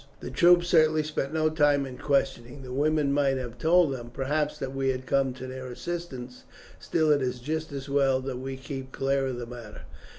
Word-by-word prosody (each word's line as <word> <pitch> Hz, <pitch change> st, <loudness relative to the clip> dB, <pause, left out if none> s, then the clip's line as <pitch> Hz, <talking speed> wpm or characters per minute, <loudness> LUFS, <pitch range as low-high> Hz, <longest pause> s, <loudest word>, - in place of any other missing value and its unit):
The -, -, -7 dB
troops 175 Hz, 0 st, +5 dB
certainly 155 Hz, -2 st, +4 dB
spent 150 Hz, -2 st, -3 dB
no 155 Hz, 0 st, +1 dB
time 145 Hz, -2 st, +3 dB
in 130 Hz, -1 st, -9 dB
questioning; 135 Hz, -2 st, -1 dB
the 125 Hz, -1 st, -7 dB
women 150 Hz, 0 st, +2 dB
might 140 Hz, -2 st, +2 dB
have 120 Hz, -2 st, -6 dB
told 165 Hz, -1 st, +4 dB
them, 120 Hz, -2 st, -7 dB
perhaps, 145 Hz, +4 st, -1 dB
that 135 Hz, -1 st, -5 dB
we 135 Hz, 0 st, 0 dB
had 130 Hz, 0 st, -2 dB
come 135 Hz, -1 st, +2 dB
to 130 Hz, +1 st, -8 dB
their 130 Hz, 0 st, -7 dB
assistance; 130 Hz, -3 st, -6 dB, 0.4 s
still 155 Hz, -2 st, +1 dB
it 145 Hz, -1 st, +3 dB
is 125 Hz, -1 st, -2 dB
just 155 Hz, +5 st, -3 dB
as 135 Hz, 0 st, -6 dB
well 135 Hz, -2 st, +2 dB
that 130 Hz, -1 st, -4 dB
we 135 Hz, 0 st, -5 dB
keep 130 Hz, 0 st, -7 dB
clear 135 Hz, 0 st, 0 dB
of 130 Hz, -2 st, -3 dB
the 120 Hz, -, -5 dB
matter." 115 Hz, -3 st, -10 dB
135 Hz, 205 wpm, -27 LUFS, 130-150 Hz, 0.4 s, troops